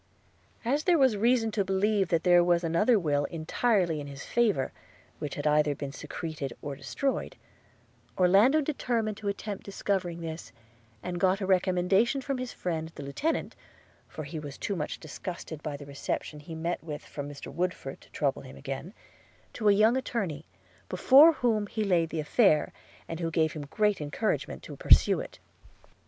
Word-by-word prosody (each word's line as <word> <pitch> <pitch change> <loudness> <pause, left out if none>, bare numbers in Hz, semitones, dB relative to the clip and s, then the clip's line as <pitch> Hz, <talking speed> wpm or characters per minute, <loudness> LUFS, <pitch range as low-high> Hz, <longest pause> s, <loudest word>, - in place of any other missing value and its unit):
As 285 +6 +1
there 355 -2 +5
was 265 -5 +4
great 205 - -4
reason 230 -1 +3
to 210 -1 +1
believe 195 +1 +1
that 165 -1 +1
there 175 -1 +6
was 175 0 +2
another 170 +8 +3
will 145 -6 +1
entirely 170 +2 0
in 145 - -7
his 140 0 -8
favour, 215 - +1 0.5
which 145 -2 -4
had 145 - -4
been 150 0 +3
either 145 -2 +1
secreted 150 -1 -5
or 145 -1 -5
destroyed, 145 - -2 0.8
Orlando 200 - +5
determined 235 -7 -1
to 205 - -6
attempt 200 0 -4
discovering 185 -4 -2
this, 160 0 -6 0.5
and 175 -1 -3
got 190 +1 +3
a 195 - -2
recommendation 190 +6 +2
from 270 0 -3
his 255 -1 -4
friend 160 -2 -3
the 145 - -7
lieutenant 280 - -2 0.5
(for 155 - -7
he 155 +2 -6
was 145 -2 -8
too 200 - -2
much 150 -4 -4
disgusted 160 0 -7
by 150 -2 -4
the 145 - -10
reception 140 +2 -4
he 160 +2 -9
met 165 +2 -3
with 150 -2 -6
from 145 -1 -6
Mr 140 -1 -9
Woodford 170 -5 -3
to - - -19
trouble 140 -2 -1
him 130 - -12
again) 135 - -6 0.6
to 215 -3 +2
a - - +8
young 215 +4 +4
attorney, 195 - -2 0.4
before 295 +5 +7
whom 225 -7 0
he 220 0 -2
laid 175 -5 +2
the 160 - -3
affair, 155 +1 +3 0.3
and 165 - -5
who 165 -1 -1
gave 160 -1 +1
him 145 -2 -6
great 210 +2 +1
encouragement 150 +9 -2
to - - -8
pursue - - +5
it. - - -8
175 Hz, 175 wpm, -29 LUFS, 150-215 Hz, 0.8 s, a